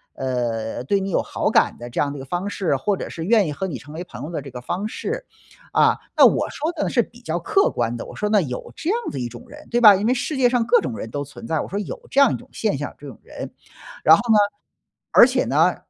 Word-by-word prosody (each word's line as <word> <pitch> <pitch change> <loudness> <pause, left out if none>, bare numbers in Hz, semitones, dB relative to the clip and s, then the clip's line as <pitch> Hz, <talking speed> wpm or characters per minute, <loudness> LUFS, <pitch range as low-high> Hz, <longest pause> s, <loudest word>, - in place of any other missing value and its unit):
呃， 120 -3 -2
对 195 +9 +1
你 195 0 -3
有 - - +2
好 - - -2
感 - - +3
的 120 0 -8
这 - - -1
样 140 -1 0
的 145 - -7
一 - - -7
个 - - -8
方 180 +6 -3
式， 180 -8 0
或 195 +8 0
者 - - -6
是 165 - -6
愿 210 -4 +4
意 150 - -3
和 190 +6 -3
你 145 -8 -5
成 145 +6 -12
为 170 +3 -5
朋 175 - -10
友 155 - -5
的 155 - -3
这 140 - -9
个 125 - -7
方 185 +11 -3
式。 - - -4 0.5
啊， - - +4 0.2
那 - - +9
我 - - +3
说 310 +3 -2
的 315 - -2
呢 - - -1
是 240 - +3
比 240 +2 -11
较 170 -4 -2
客 390 - +2
观 120 0 -1
的， - - -6
我 - - -10
说 210 - -1
那 210 -2 +4
有 125 -6 -5
这 325 - -4
样 470 - +1
的 135 - -5
一 120 - -2
种 120 - -11
人， 300 0 -13
对 240 - +2
吧？ 210 -3 +9
因 200 +3 -1
为 250 - +4
世 275 +4 -2
界 245 -2 +4
上 240 -2 +1
各 245 - +5
种 120 -3 -4
人 110 - -6
都 145 +4 -3
存 145 +11 -11
在， 160 -2 0
我 - - -5
说 200 - -2
有 205 - -6
这 275 - +3
样 275 - +6
一 - - 0
种 - - -15
现 210 -11 -1
象， 145 - -5
这 145 - -10
种 125 - -10
人。 - - -8 0.5
然 160 - +8
后 - - -2
呢， - - +6 0.7
而 240 - +8
且 255 0 +1
呢 160 +6 +3
175 Hz, 315 characters per minute, -22 LUFS, 135-230 Hz, 0.7 s, 那